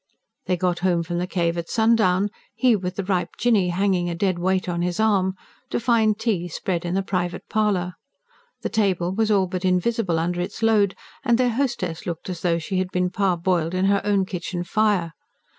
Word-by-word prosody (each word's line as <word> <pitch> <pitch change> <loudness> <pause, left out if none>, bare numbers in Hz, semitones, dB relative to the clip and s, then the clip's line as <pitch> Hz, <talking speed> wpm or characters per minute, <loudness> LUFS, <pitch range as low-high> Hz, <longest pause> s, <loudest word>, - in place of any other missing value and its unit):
They 180 - +1
got 175 0 0
home 175 -2 +1
from 175 +1 -3
the 180 - -2
cave 170 -2 0
at 170 - -6
sundown, 215 -4 +3 0.3
he 235 +1 +4
with 180 -2 -3
the 200 - -2
ripe 180 -2 -1
Jinny 215 -7 +2
hanging 180 -1 +1
a 170 - -3
dead 185 0 0
weight 185 +1 0
on 175 -1 -1
his 175 +1 -1
arm, 195 -4 +2 0.3
to - - -1
find 225 -3 +2
tea 210 -6 -1
spread 175 +1 -3
in 175 +1 -1
the 195 - +1
private 180 -2 -3
parlour. 200 -5 +1 0.7
The - - -1
table 190 -5 +1
was 220 +2 +1
all 200 -3 +3
but 185 0 -4
invisible 185 0 +1
under 175 +2 -1
its 180 +5 -5
load; 210 -3 +3 0.3
and 240 -3 +3
their 250 -1 +2
hostess 225 -11 -2
looked 170 +2 -4
as 175 - -6
though 170 -2 +2
she 185 +3 -2
had 185 -1 -1
been 180 -1 0
parboiled 180 -3 0
on 185 +1 +1
her 200 0 +3
own 200 -2 +2
kitchen 175 -1 -4
fire. 195 -4 +1
185 Hz, 200 wpm, -23 LUFS, 175-210 Hz, 0.7 s, he